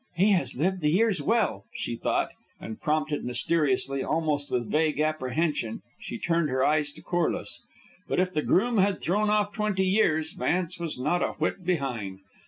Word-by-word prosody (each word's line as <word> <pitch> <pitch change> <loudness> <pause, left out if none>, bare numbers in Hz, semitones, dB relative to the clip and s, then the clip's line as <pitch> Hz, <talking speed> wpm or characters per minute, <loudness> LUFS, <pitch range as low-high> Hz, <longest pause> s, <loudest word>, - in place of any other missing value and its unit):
"He 195 +4 +4
has 145 -10 +1
lived 185 +5 0
the 150 - +2
years 200 +3 +2
well," 220 - +1
she 120 - -3
thought, 115 - 0 0.3
and 110 - -8
prompted 150 -1 0
mysteriously, 135 0 +1
almost 155 -3 0
with 120 -2 -2
vague 155 -1 +1
apprehension 155 -5 -1 0.2
she 120 - -6
turned 165 0 +1
her 130 0 +1
eyes 150 -1 +2
to - - -14
Corliss. 175 -2 -1 0.5
But - - 0
if 185 0 +1
the 150 - +1
groom 225 +8 +2
had 195 0 +2
thrown 210 +4 +1
off 210 -1 +2
twenty 210 -3 0
years, 160 -6 +2
Vance 175 0 -1
was 165 -5 -4
not 150 +8 0
a - - 0
whit 190 - -2
behind. 125 - -2
160 Hz, 175 wpm, -27 LUFS, 140-185 Hz, 0.5 s, He